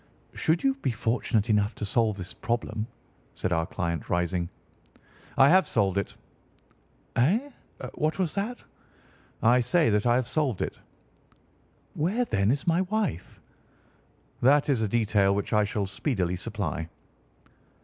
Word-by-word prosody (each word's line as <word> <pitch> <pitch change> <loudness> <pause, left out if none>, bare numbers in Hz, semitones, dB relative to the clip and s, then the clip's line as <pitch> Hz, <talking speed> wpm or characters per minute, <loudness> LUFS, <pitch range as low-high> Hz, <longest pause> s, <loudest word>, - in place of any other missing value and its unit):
"Should 160 +2 0
you 270 0 +3
be - - 0
fortunate 115 -1 0
enough 105 -1 +1
to 105 - -4
solve 110 0 +1
this 95 -1 -7
problem," 115 -2 -3 0.5
said 95 - -1
our 80 -1 0
client, 85 -3 -3
rising. 85 0 0 0.9
"I 135 - +7
have 185 +3 +5
solved 100 -4 +1
it." 100 - -6 1.0
"Eh? 215 - +2 0.4
What 155 +1 -1
was 180 -5 -1
that?" 215 +5 -3 0.8
"I 120 +3 +5
say 125 +3 +2
that 105 +3 +2
I 120 - +4
have 125 -1 0
solved 135 - 0
it." - - -5 1.1
"Where, 195 +11 0
then, 100 - +1
is 140 +3 0
my 170 +1 +3
wife?" 195 - -2 1.0
"That 145 +4 +4
is 130 -5 +2
a 110 - +1
detail 105 -3 +2
which 100 - -2
I 105 0 +4
shall 105 0 -2
speedily 95 - -1
supply." 85 -2 -4
115 Hz, 140 wpm, -27 LUFS, 100-155 Hz, 1.1 s, I